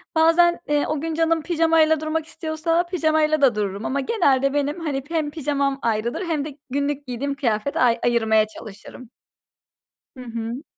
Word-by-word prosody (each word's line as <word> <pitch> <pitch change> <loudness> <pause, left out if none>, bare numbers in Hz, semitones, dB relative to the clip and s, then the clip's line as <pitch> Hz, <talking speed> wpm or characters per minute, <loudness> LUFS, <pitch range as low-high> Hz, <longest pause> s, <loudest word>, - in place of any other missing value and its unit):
bazen, 340 +2 +4
eee, 295 -1 +1
o 305 -2 -2
gün 325 0 -3
canım 325 0 +1
pijamayla 320 -2 +3
durmak 315 0 -2
istiyorsa 325 +1 -1
pijamayla 315 -3 +1
da 250 -5 +4
dururum 205 0 -3
ama 280 +1 -1
genelde, 275 - +2
benim 290 +3 -1
hani 280 -5 -3
hem 315 -3 -1
pijamam 280 -3 -1
ayrıdır 230 - -1
hem 305 -4 -1
de 295 -2 -8
günlük 285 +1 -2
giydiğim 275 +3 -3
kıyafet 235 0 -1
ay 240 -2 +3
ayırmaya 220 -2 +3
çalışırım. 215 +3 -12 1.1
Hı 255 - -9
hı. 235 +3 -5
285 Hz, 155 wpm, -22 LUFS, 250-320 Hz, 1.1 s, bazen